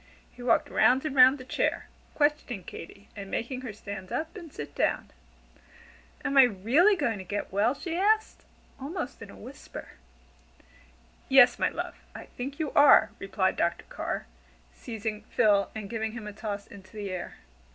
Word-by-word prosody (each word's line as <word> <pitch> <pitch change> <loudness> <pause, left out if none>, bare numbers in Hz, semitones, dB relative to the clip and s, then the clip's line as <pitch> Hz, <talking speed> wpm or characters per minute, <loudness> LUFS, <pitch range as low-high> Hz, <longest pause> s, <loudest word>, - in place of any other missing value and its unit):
He 250 - -14
walked 245 -2 +2
round 260 +4 +4
and 295 -3 -3
round 260 +1 +7
the 255 - -11
chair, - - -1 0.3
questioning 290 -9 0
Katy 200 +5 -11
and 200 -2 -8
making 255 +5 -3
her 255 -4 -6
stand 200 -3 -8
up 320 +4 -3
and 340 -6 -9
sit 150 - -8
down. - - -1 1.1
"Am 275 - 0
I - - +11
really 250 - +3
going 235 - -1
to - - -6
get 205 +3 -4
well?" 215 +7 +2
she 325 +3 -5
asked, 430 +4 +1 0.4
almost 280 -2 -5
in 215 - -9
a - - -12
whisper. 260 +5 -10 1.4
"Yes, 265 -2 +7
my - - +2
love, - - -5 0.2
I - - -8
think 275 +3 -7
you 315 -3 -2
are," 285 -1 +6
replied 190 -1 0
Dr. 170 0 0
Carr, - - -4 0.5
seizing 220 -2 -5
Phil 200 -3 +3
and 215 -2 -5
giving 220 0 -3
him 230 -2 -7
a 210 - -7
toss 205 -1 -5
into 190 -2 -15
the 200 -2 -4
air. 180 -1 -5
235 Hz, 170 wpm, -28 LUFS, 200-280 Hz, 1.4 s, I